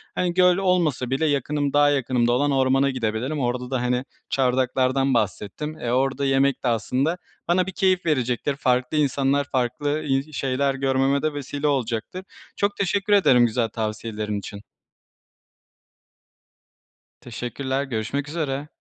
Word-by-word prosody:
Hani, 180 -1 0
göl 180 0 +4
olmasa 175 -10 +1
bile 135 +5 0
yakınım, 145 0 0
daha 145 0 +5
yakınımda 125 -4 +1
olan 145 +4 +2
ormana 135 0 +3
gidebilirim. 125 +3 -2
Orada 125 0 -2
da, 130 -2 0
hani, 125 +1 0 0.2
çardaklardan 130 +1 +1
bahsettim. 115 +7 -2
Eee, 120 - -2
orada 135 +2 +1
yemek 135 0 +2
de - - 0
aslında 130 +8 0 0.3
bana 180 +1 +2
bir - - -3
keyif 185 -1 +1
verecektir, 130 -2 0
farklı 125 +1 0
insanlar 140 -1 +2
farklı, 135 +4 -1
iii, 140 +1 -1
şeyler 135 0 0
görmeme 135 +1 +1
de 155 -1 -1
vesile 145 +1 -3
olacaktır. 130 +6 -2 0.3
Çok 200 0 0
teşekkür 200 +2 0
ederim 130 -12 +5
güzel 115 0 0
tavsiyelerin 110 -1 -3
için. 100 +1 -9 2.6
Teşekkürler, 130 +3 -3
görüşmek 135 +2 -3
üzere. 145 -3 -3
135 Hz, 135 wpm, -23 LUFS, 125-145 Hz, 2.6 s, daha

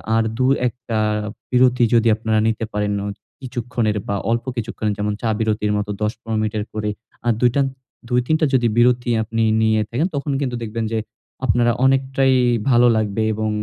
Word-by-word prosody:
আর 115 - +3
২-১ 130 -1 +2 0.2
টা 110 -1 +1 0.5
বিরতি 125 -1 +4
যদি 115 0 +4
আপনারা 110 0 0
নিতে 115 0 -1
পারেন 105 0 0
অত 100 - -6 0.2
কিছুক্ষণের 120 -4 -2
বা 100 - -1 0.2
অল্প 115 0 0
কিছুক্ষণের 110 -2 -2
যেমন 105 0 -1
চা 115 - 0
বিরতির 105 -1 0
মতো 105 0 -2
১০-১৫ 110 +1 -2
মিনিটের 105 -1 -2
করে 105 0 -2 0.4
আ - - +4
দুইটান 125 +3 +3 0.4
২-৩ 125 +5 +2
টা 160 - +3
যদি 120 -2 +3
বিরতি 120 +1 +3
আপনি 115 +1 -2 0.2
নিয়ে 110 -1 +3
থাকেন, 140 +9 0
তখন 140 +1 -2
কিন্তু 125 -3 -2
দেখবেন 115 0 -3
যে 115 - 0 0.5
আপনারা 120 -2 +3
অনেকটাই 135 0 +2 0.4
ভালো 120 -1 +5
লাগবে 110 0 0
এবং 110 0 -2
115 Hz, 165 wpm, -20 LUFS, 110-125 Hz, 0.5 s, ভালো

